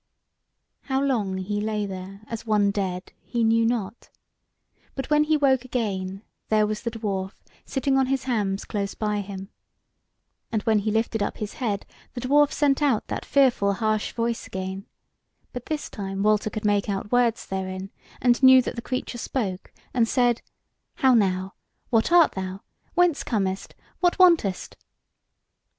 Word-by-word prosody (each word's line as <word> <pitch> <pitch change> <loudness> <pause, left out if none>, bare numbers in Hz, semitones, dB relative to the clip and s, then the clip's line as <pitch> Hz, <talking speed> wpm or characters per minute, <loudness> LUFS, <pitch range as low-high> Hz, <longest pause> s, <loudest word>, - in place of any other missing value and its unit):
How 265 -1 0
long 225 -9 0
he 205 +2 -2
lay 210 -1 -1
there 195 +1 -7
as 225 0 -6
one 210 -3 +2
dead, 190 -2 -3
he 235 -1 -2
knew 225 0 +3
not, 225 -2 -3 0.9
but 270 +2 -5
when 300 0 +4
he 310 0 +3
woke 265 -3 +3
again 195 -6 -3 0.3
there 215 -1 +4
was 210 0 -3
the 235 - -2
dwarf 200 -4 -3 0.3
sitting 270 0 +1
on 265 - +2
his 265 -1 0
hams 205 -6 -1
close 200 -1 -3
by 210 -1 -1
him. 195 -1 -8 1.0
And 215 -2 -1
when 220 -2 +3
he 210 +2 -1
lifted 225 0 0
up 205 - -2
his 210 -1 -5
head, 210 -6 -2 0.3
the 245 - -4
dwarf 290 +3 +4
sent 285 -1 +2
out 270 -7 +2
that - - -4
fearful 245 -8 +3
harsh 215 +1 0
voice 230 0 -2
again; 190 +1 -5 0.7
but 250 0 -7
this 305 -1 -3
time 195 -1 -4
Walter 215 0 +2
could 215 0 -5
make 205 0 +2
out 200 +1 -3
words 245 -2 +2
therein, 190 0 -4 0.3
and 245 0 +3
knew 260 0 +9
that - - -4
the 235 - -4
creature 255 -1 -4
spoke 200 -8 -3 0.2
and 235 -3 +3
said: 245 -1 +2 0.5
"How 265 -1 +4
now! 190 -4 +1 0.4
What 225 +6 +2
art 345 -2 +6
thou? 190 0 -5 0.3
Whence 355 -4 +3
comest? 195 -4 -2 0.2
What 355 -1 +2
wantest?" 335 - +3
220 Hz, 160 wpm, -25 LUFS, 195-255 Hz, 1.0 s, knew